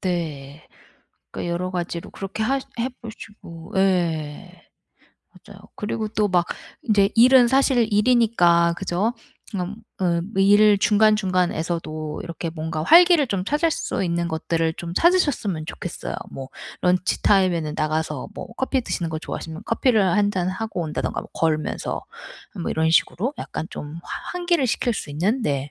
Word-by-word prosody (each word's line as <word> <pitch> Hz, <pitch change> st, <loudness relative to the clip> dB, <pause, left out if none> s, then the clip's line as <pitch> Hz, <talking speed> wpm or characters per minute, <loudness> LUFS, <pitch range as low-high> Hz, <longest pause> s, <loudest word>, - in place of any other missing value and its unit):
네. 155 Hz, -5 st, -4 dB, 0.7 s
그러니까 175 Hz, -, -4 dB
여러 180 Hz, +2 st, -2 dB
가지로 170 Hz, -1 st, -4 dB
그렇게 195 Hz, +2 st, -4 dB
하시 270 Hz, +3 st, 0 dB
해 245 Hz, +3 st, 0 dB
보시고 205 Hz, -7 st, -11 dB
예. 175 Hz, -2 st, -1 dB, 0.8 s
맞아요. 200 Hz, -1 st, -13 dB, 0.2 s
그리고 215 Hz, +1 st, -3 dB
또 210 Hz, -1 st, 0 dB
막 175 Hz, -2 st, +2 dB, 0.4 s
인제 205 Hz, -3 st, +3 dB
일은 245 Hz, +1 st, +7 dB
사실 265 Hz, -3 st, +3 dB
일이니까 205 Hz, -7 st, +4 dB
그죠? 195 Hz, +5 st, -1 dB, 0.4 s
그니까 190 Hz, -2 st, -3 dB, 0.3 s
어 170 Hz, -2 st, +1 dB, 0.2 s
일 205 Hz, +1 st, +6 dB
중간중간에서도 180 Hz, -7 st, +1 dB
이렇게 170 Hz, 0 st, -5 dB
뭔가 160 Hz, -1 st, -4 dB
활기를 340 Hz, -, +6 dB
좀 195 Hz, -5 st, -2 dB
찾을 310 Hz, +6 st, +1 dB
수 330 Hz, -7 st, -2 dB
있는 170 Hz, -1 st, -1 dB
것들을 165 Hz, 0 st, -1 dB
좀 170 Hz, 0 st, -6 dB
찾으셨으면 285 Hz, -, +2 dB
좋겠어요. -, -, -6 dB, 0.2 s
뭐 135 Hz, -1 st, -7 dB, 0.3 s
런치타임에는 180 Hz, -3 st, +2 dB
나가서 155 Hz, -2 st, -2 dB
뭐 -, -, -7 dB
커피 265 Hz, 0 st, 0 dB
드시는 175 Hz, -7 st, -3 dB
거 160 Hz, -, -3 dB
좋아하시면 160 Hz, +3 st, -7 dB
커피를 230 Hz, -1 st, +2 dB
1 205 Hz, +1 st, +3 dB
잔 185 Hz, -2 st, -1 dB
하고 190 Hz, 0 st, -4 dB
온다든가 155 Hz, -2 st, -3 dB
뭐 -, -, -11 dB
걸으면서 155 Hz, -2 st, -1 dB, 0.6 s
뭐 -, -, -2 dB
이런 160 Hz, 0 st, +1 dB
식으로 230 Hz, -, +1 dB
약간 160 Hz, -, -5 dB
좀 150 Hz, +2 st, -7 dB
화 -, -, -7 dB
환기를 345 Hz, -5 st, +1 dB
시킬 240 Hz, +1 st, 0 dB
수 145 Hz, -, -6 dB
있는 200 Hz, -, 0 dB
네. 140 Hz, -3 st, -1 dB
185 Hz, 315 characters per minute, -23 LUFS, 165-220 Hz, 0.8 s, 일은